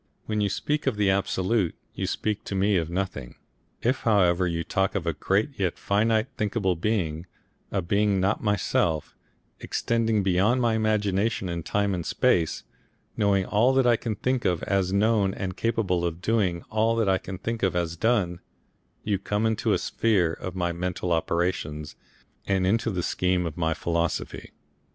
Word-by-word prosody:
When 105 -1 -1
you 100 - +1
speak 150 +8 -2
of 130 - +2
the 100 -2 +3
Absolute 95 0 0 0.2
you - - -3
speak 105 -1 -2
to 100 - -4
me 100 +2 +2
of 85 -3 0
nothing. 85 -8 -4 0.5
If 130 +3 +2
however 90 -5 +3
you 85 -1 -2
talk 95 +3 0
of 95 -4 -1
a 85 - 0
great 105 +8 0
yet 95 -3 0
finite 110 +2 +2
and 130 - -35
thinkable 105 -4 0
being, 85 -3 -1 0.4
a 95 -3 -1
being 100 +2 +2
not 95 +3 +1
myself, 85 -6 0 0.4
extending 115 -3 0
beyond 95 +7 +2
my 120 -2 +2
imagination 105 -2 0
in 85 -1 -3
time 100 +3 0
and 90 -2 -2
space, 80 0 +1 0.5
knowing 100 -2 +2
all 115 +7 +3
that 135 -1 +4
I 120 -1 +5
can 110 -1 -3
think 130 +4 -1
of 90 -4 0
as 95 -1 0
known 100 -1 +2
and 95 -2 -4
capable 105 -6 0
of 85 -1 -2
doing 90 -4 0
all 110 +1 +2
that 115 -3 +1
I 95 -1 +3
can 95 0 -7
think 115 +4 -4
of 95 -2 +1
as 85 -1 -1
done, 95 -4 +1 0.6
you 100 -3 0
come 105 +2 -1
into 110 -1 0
the - - +4
sphere 95 -8 +1
of 95 +2 -6
my 85 -2 0
mental 90 +1 -3
operations, 80 -2 -1 0.5
and 95 -1 +1
into 110 +4 +1
the 90 -5 -2
scheme 90 0 0
of 80 -2 -4
my 80 -2 0
philosophy.... 85 -1 -2
95 Hz, 175 wpm, -26 LUFS, 90-110 Hz, 0.6 s, I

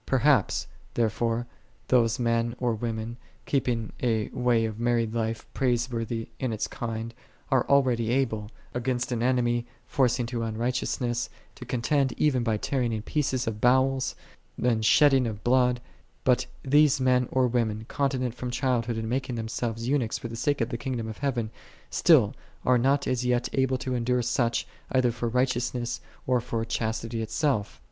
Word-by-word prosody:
"3 135 - +2
Perhaps, 125 - +3 0.3
there 115 -2 +2
fore, 115 +1 -1 0.4
those 115 -3 +4
men 115 -1 0
or 120 -2 0
women 115 +1 -4 0.3
keeping 125 -5 -1
a 110 -4 +1
way 120 -2 +2
of 110 0 -4
married 120 -2 +1
life 115 -1 -2
praiseworthy 120 -3 -1
in 130 -3 -1
its 110 - -1
kind, 115 0 -5 0.4
are - - +3
al 140 0 +6
reqdy 120 -3 0
able, 115 -5 0 0.2
against 125 +1 -1
an 120 -2 -1
enemy 120 -1 +2 0.2
forcing 125 -2 +1
to 120 0 -3
un 110 -1 -3
righteousness, 120 0 -1 0.2
to 125 - -10
contend 130 +2 +1
even 140 -5 +2
by 115 -2 +1
tearing 125 +1 -1
in 110 -1 -3
pieces 130 -2 0
of 110 -1 -4
bowels, 130 +1 +3 0.4
and 115 -3 +1
shedding 135 +1 +5
of 105 -2 -6
blood; 125 0 +3 0.4
but 125 -1 +3 0.2
these 145 0 +4
men 125 -1 +2
or 130 -1 +3
women, 115 -3 0
continent 130 -4 -1
from 125 +1 -5
child 125 -2 0
hood, 120 -2 -2
and 110 0 -3
making 125 +1 -2
themselves 115 +1 -3
eunuchs 130 -5 +1
for 115 - -6
the 115 - -6
sake 140 +3 0
of 115 - 0
the 120 - -4
Kingdom 120 -4 -3
of 110 - -7
Heaven, 120 -6 -1 0.4
still - - +5 0.3
are 125 -1 +4
not 140 +3 +2
as 125 -1 0
yet 125 -1 +1
able 130 -1 +2
to. 130 0 -3
endure 125 0 +1
such, 120 0 +1 0.3
either 130 -2 +3
for 115 0 -2
righteousness, 125 -1 0 0.2
or 125 -1 +2
for 115 -1 -2
chastity 115 0 -2
itself. 110 0 -1
120 Hz, 170 wpm, -27 LUFS, 115-130 Hz, 0.4 s, al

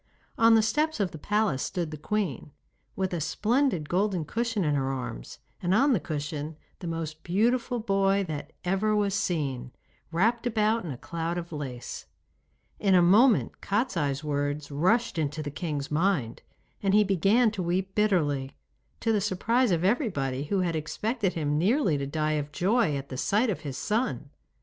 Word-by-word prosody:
On 230 0 +6
the 220 - +5
steps 300 +7 0
of 195 -3 0
the 160 - -9
palace 210 -8 0
stood 175 -4 -3
the - - -5
queen, 160 - -2 0.5
with 190 -1 -1
a 170 - -2
splendid 210 - +1
golden 185 -2 0
cushion 230 +2 -1
in 150 -2 +1
her 135 -1 0
arms, 125 - -6 0.2
and 185 +1 +2
on 275 +4 +4
the 215 - +2
cushion 150 0 -4 0.2
the 175 - -6
most 160 -1 -4
beautiful 235 +6 +1
boy 195 -2 +2
that 150 -2 -5
ever 195 +4 +1
was 205 -2 +1
seen, 140 -10 -2 0.4
wrapped 230 +8 +1
about 220 -1 +1
in 170 - -5
a 130 - -5
cloud 170 +4 -3
of 170 -1 -5
lace. 135 -6 -6 0.7
In 195 -2 +3
a 180 - +6
moment 215 +7 +4
Kostiei's 170 - -1
words 145 0 -2
rushed 185 +7 +1
into 155 0 -2
the 145 - -5
king's 145 -2 -4
mind, 150 - 0 0.4
and 195 0 +2
he 210 - +6
began 200 +5 +3
to 205 -3 -4
weep 185 +2 -1
bitterly, 150 -11 +1 0.4
to 225 - +2
the 210 - +2
surprise 225 +5 +1
of 170 -2 +1
everybody, 145 - 0
who 190 +5 0
had 170 -2 0
expected 200 - -1
him 150 -2 0
nearly 205 - +2
to 140 - -3
die 155 +1 -1
of 145 +1 -9
joy 190 -1 +2
at 140 0 -7
the 130 - -5
sight 215 - +2
of 180 - -3
his 145 -4 -6
son. 180 - -1
180 Hz, 175 wpm, -27 LUFS, 150-215 Hz, 0.7 s, On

